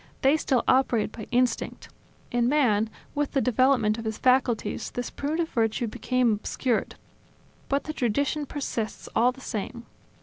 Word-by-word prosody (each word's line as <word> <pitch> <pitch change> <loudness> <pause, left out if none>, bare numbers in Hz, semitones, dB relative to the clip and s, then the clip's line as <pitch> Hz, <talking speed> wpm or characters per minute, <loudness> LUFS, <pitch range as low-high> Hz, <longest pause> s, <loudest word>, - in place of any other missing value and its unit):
They 270 +3 +5
still 270 -5 +1
operate 250 -5 +3
by 220 -2 -8
instinct; 245 -1 0 0.4
in 240 0 +2
man, 225 -7 +3 0.2
with 290 -1 -1
the 275 - +3
development 250 -3 +3
of 225 - -7
his 220 -1 -2
faculties, 250 -4 +1
this 245 - -4
primitive 320 +3 -2
virtue 225 0 0
became 245 +1 +1
obscured, 225 +3 -1 0.7
but 280 +1 +1
the 310 - -5
tradition 280 +4 0
persists 240 -7 -4
all 240 +3 +4
the 265 +1 -14
same. 235 +1 -5
250 Hz, 145 wpm, -26 LUFS, 225-270 Hz, 0.7 s, They